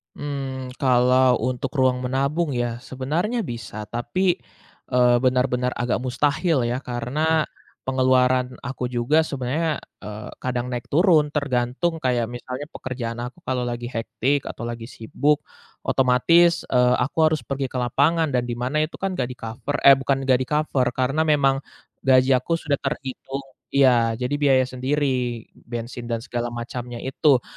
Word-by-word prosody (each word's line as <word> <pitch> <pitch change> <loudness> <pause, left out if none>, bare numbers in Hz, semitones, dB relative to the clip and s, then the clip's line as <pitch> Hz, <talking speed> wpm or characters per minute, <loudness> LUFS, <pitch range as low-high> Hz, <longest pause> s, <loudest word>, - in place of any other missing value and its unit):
Mmm, 135 -3 -5
kalau 125 0 +4
untuk 130 +2 -2
ruang 130 -2 +3
menabung 140 +4 0
ya 120 -1 -2
sebenarnya 160 - -2
bisa, 115 - -6
tapi, 120 - 0 0.5
eee, 125 -1 +4
benar-benar 125 0 +1
agak 120 +1 0
mustahil 140 +3 +1
ya 120 +2 -1
karena 145 +6 0 0.4
pengeluaran 130 -1 +2
aku 130 -2 -3
juga 125 +7 +2
sebenarnya, 145 +4 -2 0.2
eee, 105 +1 -8
kadang 125 0 -2
naik 120 -1 -4
turun 160 -1 +4
tergantung 140 +4 0
kayak 120 -3 0
misalnya 125 +3 -6
pekerjaan 120 -2 -5
aku 170 +8 -15
kalau 125 -1 -1
lagi 120 0 -4
hektik 130 +4 -1
atau - - -6
lagi 115 -1 -5
sibuk, 145 +7 0 0.4
otomatis, 165 +7 +4
eee, 125 -1 +3
aku 125 +6 -2
harus 155 -5 -1
pergi 135 +2 -2
ke 130 - -15
lapangan 145 +6 +2
dan 125 -1 0
di 120 - -3
mana 125 +5 -1
itu - - -12
kan 190 -3 -3
nggak 125 - 0
di-cover 125 +5 -4
eh, 135 -1 +8
bukan 135 0 0
nggak 130 -2 +3
di-cover, 135 -1 0
karena 135 +5 +1
memang 135 -3 +3 0.5
gaji 130 0 +5
aku 130 +6 +2
sudah 145 -4 -1
terhitung 135 0 -4 0.3
iya, 120 -4 +4
jadi 125 +4 -2
biaya 135 -3 +4
sendiri 130 -2 -1 0.2
bensin 120 0 -6
dan 115 -1 -2
segala 120 0 -3
macamnya 120 +1 -6
itu. 130 -1 +2
130 Hz, 145 wpm, -23 LUFS, 120-140 Hz, 0.5 s, eh